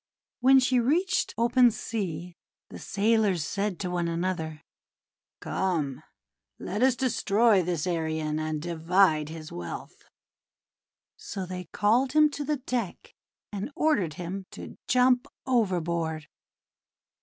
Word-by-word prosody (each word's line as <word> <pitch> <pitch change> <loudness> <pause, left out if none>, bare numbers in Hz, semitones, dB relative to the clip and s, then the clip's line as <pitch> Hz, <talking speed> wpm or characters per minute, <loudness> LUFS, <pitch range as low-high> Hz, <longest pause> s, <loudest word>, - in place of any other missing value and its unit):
When 265 +2 +6
she 255 -1 +2
reached 345 +10 +1
open 240 +2 +5
sea, 180 -7 -4 0.4
the - - -8
sailors 205 -5 +1
said 200 0 -2
to 180 -2 -3
one 175 -1 -1
another: 165 -2 -3 0.8
:<Come, 160 -8 -1 0.6
let 205 +4 -4
us 260 -1 +4
destroy 225 -4 +3
this 170 -2 -2
Arion, 160 -3 -1
and 155 -1 -2
divide 165 -1 +2
his 155 -1 -8
wealth." 85 -1 -8 1.1
So 195 -2 -6
they 180 0 -6
called 235 - +1
him 305 -1 +5
to 290 - -4
the 300 +1 -1
deck 250 -6 -4 0.4
and 205 +4 -4
ordered 205 - +1
him 185 +3 -6
to - - -10
jump 250 0 +3 0.2
overboard. 170 - 0
190 Hz, 120 wpm, -27 LUFS, 165-240 Hz, 1.1 s, When